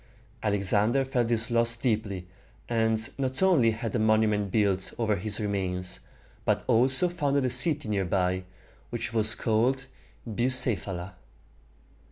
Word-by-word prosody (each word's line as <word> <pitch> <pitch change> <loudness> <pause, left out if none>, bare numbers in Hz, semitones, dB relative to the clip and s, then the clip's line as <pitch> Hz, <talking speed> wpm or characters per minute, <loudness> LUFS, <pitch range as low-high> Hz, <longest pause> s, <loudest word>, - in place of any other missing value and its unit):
Alexander 105 +5 +1
felt 125 -3 -1
this 115 0 +1
loss 115 0 +3
deeply, 105 -7 -2 0.4
and 110 -1 0
not 130 +5 0
only 165 -12 +4
had 115 +1 -4
a - - +1
monument 110 -2 +1
built 100 -3 0
over 110 -3 0
his 100 +2 0
remains, 90 -3 -3 0.4
but - - 0
also 130 +8 +3
founded 145 -6 -1
a 125 - -1
city 145 +2 +3
near 100 -2 -1
by, 90 +1 -1 0.5
which 120 -1 -5
was 110 -1 +2
called 125 +4 0 0.4
Bu 120 +2 -1
ceph´a 130 -5 +4
la. 90 +3 -8
110 Hz, 140 wpm, -27 LUFS, 100-125 Hz, 0.5 s, only